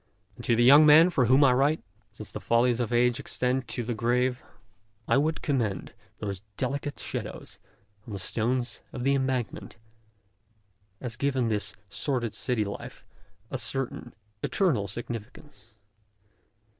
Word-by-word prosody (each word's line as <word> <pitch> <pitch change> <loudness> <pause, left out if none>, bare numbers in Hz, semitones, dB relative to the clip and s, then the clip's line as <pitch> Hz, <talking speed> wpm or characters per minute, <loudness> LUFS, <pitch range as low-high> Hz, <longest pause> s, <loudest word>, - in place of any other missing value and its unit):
And - - -11
to 115 - +3
the 120 - +3
young 140 +5 +8
men 155 +4 +7
for 130 -7 +2
whom 130 +5 +5
I 130 -2 +6
write, 140 +5 +2 0.3
since - - -10
the - - -6
follies 120 +1 +2
of 120 -1 -1
age 120 +1 +2
extend 130 -1 -1
to 120 - -3
the 120 +1 -2
grave, 125 +2 0 0.7
I - - +3
would 155 +3 0
commend 120 -9 -1 0.2
those 100 -2 -5 0.2
delicate 140 +3 -3
shadows - - -6 0.5
on 110 - -7
the - - -3
stones 120 +4 -1
of 125 - -5
the 135 +1 +3
Embankment, 130 -5 -2 1.2
as 120 -2 -6
giving 130 -4 0
this 105 -2 0
sordid 120 0 -1
city 115 +1 -1
life 100 - -8 0.5
a 130 - -2
certain 120 +1 -2 0.3
eternal 145 - +1
significance. 115 +1 -8
125 Hz, 145 wpm, -27 LUFS, 115-135 Hz, 1.2 s, young